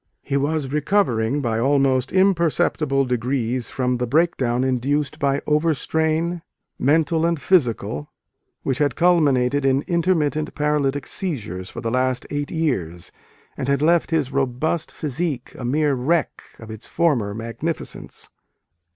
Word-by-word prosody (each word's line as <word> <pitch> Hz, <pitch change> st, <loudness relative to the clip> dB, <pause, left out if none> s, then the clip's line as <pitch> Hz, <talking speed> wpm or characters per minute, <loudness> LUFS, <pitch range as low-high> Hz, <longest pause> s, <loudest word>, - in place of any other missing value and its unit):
He 140 Hz, -, -2 dB
was 140 Hz, 0 st, -1 dB
recovering 145 Hz, -, +1 dB
by 115 Hz, -3 st, -1 dB
almost 135 Hz, 0 st, +2 dB
imperceptible 165 Hz, -7 st, +2 dB
degrees 125 Hz, 0 st, -1 dB
from 125 Hz, -1 st, -1 dB
the 125 Hz, 0 st, -2 dB
breakdown 130 Hz, -4 st, +1 dB
induced 140 Hz, +4 st, 0 dB
by 140 Hz, 0 st, 0 dB
over 150 Hz, +1 st, +2 dB
strain, 160 Hz, +4 st, 0 dB, 0.4 s
mental 160 Hz, +3 st, +2 dB
and 170 Hz, -1 st, +1 dB
physical, 115 Hz, -, +1 dB, 0.5 s
which 135 Hz, 0 st, -1 dB
had 145 Hz, -4 st, +1 dB
culminated 145 Hz, -6 st, +3 dB
in 135 Hz, +1 st, +2 dB
intermittent 165 Hz, -4 st, 0 dB
paralytic 145 Hz, -2 st, 0 dB
seizures 110 Hz, -, -5 dB
for -, -, -7 dB
the 115 Hz, -, -2 dB
last 130 Hz, 0 st, 0 dB
eight 145 Hz, -1 st, -2 dB
years, 95 Hz, -, -2 dB, 0.4 s
and 130 Hz, -, -4 dB
had 140 Hz, +1 st, +1 dB
left 170 Hz, +1 st, +3 dB
his 150 Hz, -5 st, 0 dB
robust 140 Hz, +5 st, -1 dB
physique 150 Hz, -2 st, -3 dB
a -, -, -8 dB
mere 145 Hz, +4 st, +1 dB
wreck 145 Hz, +5 st, 0 dB, 0.2 s
of 115 Hz, -1 st, -10 dB
its 110 Hz, +1 st, -8 dB
former 130 Hz, -12 st, +1 dB
magnificence. 115 Hz, +9 st, -5 dB
140 Hz, 135 wpm, -22 LUFS, 125-160 Hz, 0.5 s, culminated